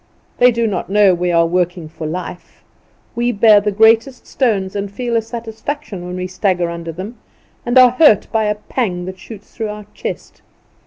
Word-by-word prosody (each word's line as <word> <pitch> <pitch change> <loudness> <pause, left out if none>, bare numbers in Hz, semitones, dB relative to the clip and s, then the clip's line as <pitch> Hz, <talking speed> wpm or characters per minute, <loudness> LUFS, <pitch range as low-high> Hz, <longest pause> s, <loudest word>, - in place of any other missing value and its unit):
They 250 - +7
do 235 0 -1
not 190 -5 -3
know 200 -1 +4
we 175 0 -1
are 170 -1 +3
working 175 -1 -1
for 155 0 -7
life. 180 +2 -7 0.5
We 240 +1 0
bear 210 -1 +5
the 210 0 -1
greatest 225 +5 +3
stones, 205 -8 -1
and 200 0 -3
feel 240 +3 -3
a 230 - +2
satisfaction 225 0 -6
when 180 - -6
we 185 0 -4
stagger 185 -2 -1
under 170 -1 -6
them, 195 +8 -8 0.5
and 240 +2 +2
are 255 -1 +8
hurt 255 -4 +4
by 220 -1 +1
a 210 0 0
pang 205 -4 -3
that 185 0 -8
shoots 210 +1 -13
through 220 -2 -3
our 210 0 -8
chest. - - -7
205 Hz, 190 wpm, -17 LUFS, 180-230 Hz, 0.5 s, are